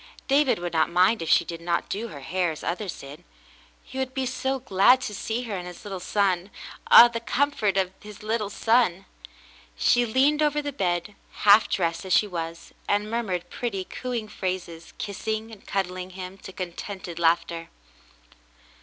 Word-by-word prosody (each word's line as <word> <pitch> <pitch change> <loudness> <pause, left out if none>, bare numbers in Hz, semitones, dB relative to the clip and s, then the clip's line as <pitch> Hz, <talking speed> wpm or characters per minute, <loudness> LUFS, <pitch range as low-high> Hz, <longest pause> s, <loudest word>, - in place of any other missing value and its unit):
David 275 0 +3
would 175 -1 -5
not 160 -1 +2
mind 185 +5 +3
if 165 - -3
she - - +5
did 170 -1 -7
not 170 0 -1
do 220 +4 -3
her 145 -10 -10
hair 180 +5 0
as 155 - -8
others 185 +1 -3
did, 145 +5 -11 0.6
he 265 - -8
would 260 0 -3
be 265 -1 0
so 265 +1 -1
glad 245 +1 +4
to 215 - -4
see 225 +4 -3
her 220 -4 -4
and 180 -1 -5
his 180 +2 -11
little 195 -2 -5
son. 185 0 0 0.4
Ah, 240 - +11
the 235 -1 -4
comfort 230 -4 0
of 185 -1 +1
that 210 -1 -12
little 215 -1 -1
son! 210 -4 +2 0.7
She 245 - +4
leaned 275 +6 +3
over 300 -1 +2
the 290 -1 -4
bed, 180 -3 -1 0.3
half 210 +1 +7
dressed 170 -3 -1
as 190 -1 -1
she - - +5
was, 165 -3 -6 0.2
and 205 +1 +1
murmured 195 -7 -2
pretty 205 -6 -3
coo 255 +6 -6
ing 230 -3 -2
phrases, 180 -4 -5
kissing 220 +2 -4
and 215 - -14
cuddling 185 -1 -2
him 185 +1 -8
to 190 - -10
contented 180 -1 -6
laughter. 165 0 +1
195 Hz, 180 wpm, -25 LUFS, 175-230 Hz, 0.7 s, Ah